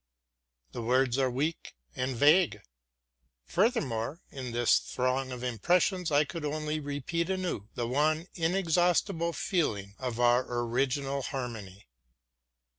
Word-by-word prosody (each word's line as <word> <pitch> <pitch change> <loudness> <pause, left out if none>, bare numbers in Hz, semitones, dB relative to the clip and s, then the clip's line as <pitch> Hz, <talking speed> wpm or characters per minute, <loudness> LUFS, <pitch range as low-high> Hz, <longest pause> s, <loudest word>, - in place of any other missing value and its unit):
The - - -5
words 130 +2 +2
are 130 -1 +2
weak 145 +6 -3 0.2
and 130 0 -2
vague. 145 - +4 0.8
Furthermore, 160 - 0
in 130 -3 -6
this 120 0 +3
throng 130 +1 -1
of 125 -1 -6
impressions 175 - +1
I 145 +1 +5
could 160 +2 -6
only 155 +1 -2
repeat 145 +4 -3
anew 185 - -2
the 120 -2 -1
one 155 +5 +1
inexhaustible 175 0 +1
feeling 105 - -1
of 125 -3 -4
our 120 +1 +4 0.2
original 135 +3 -1
harmony. 115 -8 -6
140 Hz, 115 wpm, -30 LUFS, 125-165 Hz, 0.8 s, I